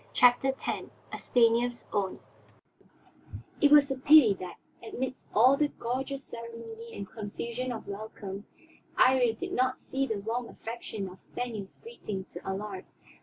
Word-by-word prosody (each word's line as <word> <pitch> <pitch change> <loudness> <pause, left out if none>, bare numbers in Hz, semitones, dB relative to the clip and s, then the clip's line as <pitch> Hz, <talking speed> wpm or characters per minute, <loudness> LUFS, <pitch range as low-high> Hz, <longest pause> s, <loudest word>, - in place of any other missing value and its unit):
CHAPTER 245 +2 +5
X - - -8 0.5
A - - -4
STANIEF'S 240 0 +2
OWN 195 -2 -1 1.4
It 290 - +7
was 290 -2 +7
a 270 - -1
pity 285 -6 +8
that, 180 -1 -6 0.3
amidst 255 +3 -5
all 250 +6 +6
the 300 - +3
gorgeous 270 +2 -4
ceremony 230 -1 -8
and 200 - -5
confusion 235 +4 -4
of 225 - -6
welcome, 200 -1 -7 0.5
Iría 250 -3 +5
did - - -5
not 255 0 +1
see 270 0 -2
the 220 - -1
warm 230 +4 -3
affection 225 -3 -6
of 185 0 -12
Stanief's 225 -6 -6
greeting 210 - -6
to - - -9
Allard. 190 0 -4
235 Hz, 140 wpm, -29 LUFS, 210-255 Hz, 1.4 s, pity